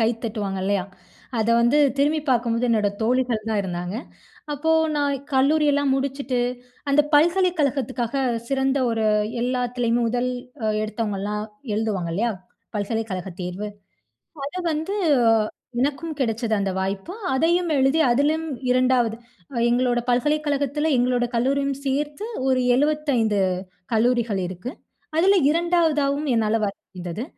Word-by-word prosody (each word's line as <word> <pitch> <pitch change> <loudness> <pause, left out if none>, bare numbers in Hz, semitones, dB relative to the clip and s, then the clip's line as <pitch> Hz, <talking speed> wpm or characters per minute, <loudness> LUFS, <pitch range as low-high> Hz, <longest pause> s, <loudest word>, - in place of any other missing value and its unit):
கை 225 - +4 0.2
தட்டுவாங்க 205 -4 -3
இல்லையா? 200 -2 +1 0.5
அத, 220 +1 +1
வந்து 240 +6 +4 0.2
திரும்பி 300 +2 +2
பாக்கும்போது 235 -1 +1
என்னோட 215 -3 +2
தோழிகள் 240 -2 0
தான் 215 -2 +1
இருந்தாங்க. 180 +2 -4 0.6
அப்போ, 320 +3 +1 0.2
நான் 285 -1 +1 0.2
கல்லூரியெல்லாம் 285 0 +3
முடிச்சுட்டு, 270 -2 -1 0.5
அந்த 280 - +5
பல்கலைக்கழகத்துக்காக 290 -7 +2 0.3
சிறந்த 270 0 +1
ஒரு 225 -1 0 0.4
எல்லாத்துலயும், 245 -1 0
முதல் 245 +2 0 0.5
எடுத்தவங்கலாம் 210 -1 -3 0.3
எழுதுவாங்கல்லையா? 210 0 -1 0.5
பல்கலைக்கழக 205 -3 -3
தேர்வு. 185 +4 -4 0.8
அத 290 - -7 0.2
வந்து, 320 +7 -2 0.8
எனக்கும் 295 +4 -1
கிடைச்சது, 230 -2 0
அந்த 195 -1 0
வாய்ப்பு. 195 - -3 0.2
அதையும் 340 +4 +2
எழுதி 270 +4 +3
அதிலும் 300 +5 +2 0.3
2வது 250 -3 +2 0.5
எங்களோட 245 0 +2
பல்கலைக்கழகத்தில, 290 +2 +1
எங்களோட 245 0 +2
கல்லூரியும் 275 +2 +1
சேர்த்து 295 +7 -2 0.2
ஒரு 260 -1 +3 0.2
75 275 -7 +1 0.5
கல்லூரிகள் 230 -3 +2
இருக்கு. 185 +8 -6 0.5
அதில 390 +4 +5 0.2
2வதாவும் 315 -4 +1
என்னால 225 -1 +2
வர 200 - -1 0.2
முடிந்தது. 180 +4 -6
250 Hz, 105 wpm, -23 LUFS, 220-285 Hz, 0.8 s, அந்த